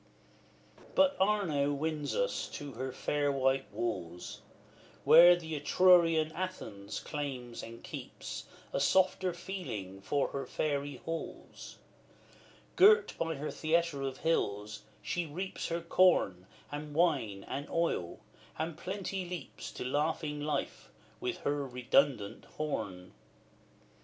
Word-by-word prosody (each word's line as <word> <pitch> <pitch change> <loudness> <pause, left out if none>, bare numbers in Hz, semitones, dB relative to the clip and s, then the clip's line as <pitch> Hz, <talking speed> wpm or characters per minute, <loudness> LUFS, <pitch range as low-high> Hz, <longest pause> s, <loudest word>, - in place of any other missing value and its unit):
But 285 0 +5
Arno 190 -8 +2
wins 150 0 -2
us - - 0
to 145 -1 -6
the 130 +2 -4
fair 145 +2 0
white 135 0 +1
walls, 90 -7 -4 0.6
Where 175 +2 +9
the 160 -2 -6
Etrurian 165 0 +5
Athens 135 - -5
claims 130 -5 -5
and 115 0 -10
keeps - - -7 0.3
A - - +1
softer 185 +5 +3
feeling 120 - -6
for 140 +8 0
her 140 - -4
fairy 145 -2 -1
halls. 165 0 -6 1.0
Girt 430 +2 +6
by 165 -1 -1
her 150 +2 -4
theatre 165 -2 +1
of 135 -1 -3
hills, 105 -10 -1 0.2
she 175 -2 -2
reaps 185 +6 -4
Her 170 0 -2
corn, 165 - +3 0.2
and 145 0 -6
wine, 135 - +1
and 140 +2 -4
oil, 165 - -1 0.4
and 160 +1 -2
Plenty 190 +1 -3
leaps 175 -5 -7
To - - -5
laughing 150 +2 -1
life, 145 -1 -3 0.3
with 370 -1 -3
her 145 0 0
redundant 125 -3 +1
horn. 95 -12 -3
150 Hz, 115 wpm, -32 LUFS, 130-170 Hz, 1.0 s, Where